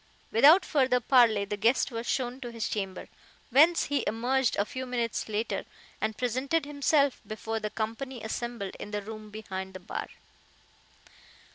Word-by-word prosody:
Without 295 - +7
further 260 -4 +2
parley 230 -5 +4
the 205 - -3
guest 230 +6 +2
was 230 0 -5
shown 255 0 -1
to 240 - -5
his 230 -1 -3
chamber, 195 -3 -4 0.4
whence 315 +7 +6
he 285 -3 0
emerged 245 +2 +1
a 200 - +1
few 260 +1 -6
minutes 235 -3 -2
later, 215 +2 -2 0.4
and 220 - -1
presented 260 +6 0
himself 285 -1 +2
before 220 +1 -3
the 215 -1 -3
company 230 +3 -4
assembled 225 -3 -4
in - - -7
the 210 -1 -3
room 215 0 -8
behind 190 -3 -6
the - - -6
bar. 180 - -5
235 Hz, 155 wpm, -29 LUFS, 215-265 Hz, 0.4 s, Without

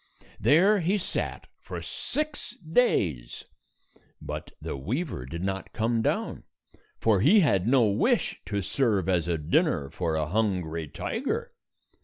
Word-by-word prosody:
133 - - -15
There 190 +8 +6
he 185 +4 +1
sat 185 - -3
for - - -6
six 305 0 -3
days; 100 - 0 0.7
but - - -6
the - - -5
weaver 105 - -3
did 85 +6 -5
not 95 0 -3
come 115 +1 +1
down, - - -1 0.5
for 110 -4 +3
he 195 - +6
had 100 - +2
no 125 -2 +5
wish 100 -1 +1
to 100 -1 -1
serve 105 -6 +1
as 90 -3 +1
a 85 -1 +1
dinner 75 -2 +1
for 85 -3 -1
a 80 -1 0
hungry 85 -4 -1
tiger. 435 - -3
105 Hz, 140 wpm, -27 LUFS, -, 0.7 s, There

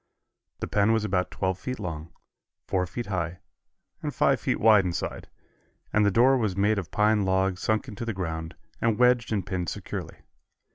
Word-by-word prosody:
The - - -2
pen 105 +2 +3
was 110 -1 +1
about 90 -3 0
twelve 95 -1 -2
feet 130 0 -4
long, 85 -5 -5 0.5
four 90 -1 0
feet 120 +7 -5
high 90 -3 -3 0.6
and - - -2
five - - +2
feet - - 0
wide 110 -3 +6
inside, 90 -2 -4 0.6
and 105 - +4
the 100 - +4
door 125 +7 +5
was 105 -5 -1
made 105 +1 +2
of 90 -6 -6
pine 105 +3 +2
logs 95 0 +1
sunk 110 +5 0
into 110 -2 -6
the 115 - -2
ground 80 -3 -4 0.3
and 115 -2 +2
wedged 125 -1 +3
and 100 -5 0
pinned 90 -4 -2
securely. - - -6
100 Hz, 180 wpm, -27 LUFS, 90-110 Hz, 0.6 s, wide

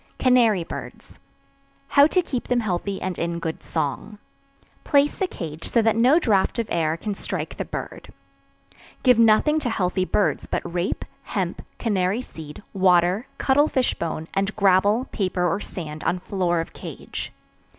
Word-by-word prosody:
CANARY 235 -8 +4
BIRDS. - - -9 0.7
How 285 0 +6
to 365 +3 +1
Keep 255 -6 -4
Them 245 -1 +2
Healthy 195 -1 -2
and 185 -1 -3
in 170 0 -1
Good 165 -1 -4
Song. 175 +9 -3 0.7
Place 285 0 +2
the 380 - +1
cage 160 - -6
so 230 - +3
that 225 0 +3
no 250 +7 +5
draught 215 - +2
of 230 - 0
air 160 -1 +1
can 210 +4 -3
strike - - -4
the - - -4
bird. - - -7 0.9
Give 250 -3 +5
nothing 230 +8 +5
to 260 - -2
healthy 185 -3 0
birds 205 - 0
but - - -2
rape, 180 +1 -2 0.2
hemp, - - -3 0.2
canary 200 0 0
seed, 160 -5 -10
water, 185 +3 +3
cuttle 285 +3 +3
fish 260 -4 +1
bone, 160 -1 -4
and 195 +2 -1
gravel, 200 +4 +3
paper 185 -3 0
or 195 - 0
sand 155 -6 -7
on 180 - +1
floor 180 -2 -1
of 165 - -8
cage. - - -7
200 Hz, 160 wpm, -23 LUFS, 175-240 Hz, 0.9 s, How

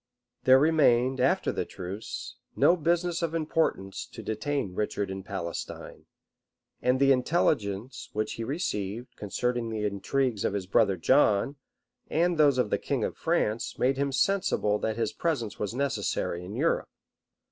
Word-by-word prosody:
There 130 0 +8
remained, 135 -4 +3
after 130 +2 +2
the - - -2
truce, 95 +4 -7 0.2
no 175 - +5
business 170 +1 0
of 165 -1 -1
importance 155 -11 -1
to - - -10
detain 110 -1 -2
Richard 100 0 -2
in 95 0 -5
Palestine; 95 -3 -6 0.7
and 125 +1 +2
the 135 0 +5
intelligence 125 - 0
which 110 0 -2
he 115 - -5
received, 120 - -3
concerning 120 +3 -2
the 110 -1 -2
intrigues 105 +3 -1
of - - 0
his 100 -2 -2
brother 95 0 +3
John, 130 - +3 0.5
and 170 +1 +1
those 145 -3 +5
of 125 -5 +1
the - - +1
king - - -1
of - - -2
France, 110 +3 -1
made 130 +1 +2
him 140 0 0
sensible 135 - +1
that 110 0 -2
his 115 - -1
presence 125 -11 -2
was 105 +2 -3
necessary 110 -9 -1
in 95 +3 -7
Europe. - - 0
125 Hz, 150 wpm, -28 LUFS, 105-145 Hz, 0.7 s, There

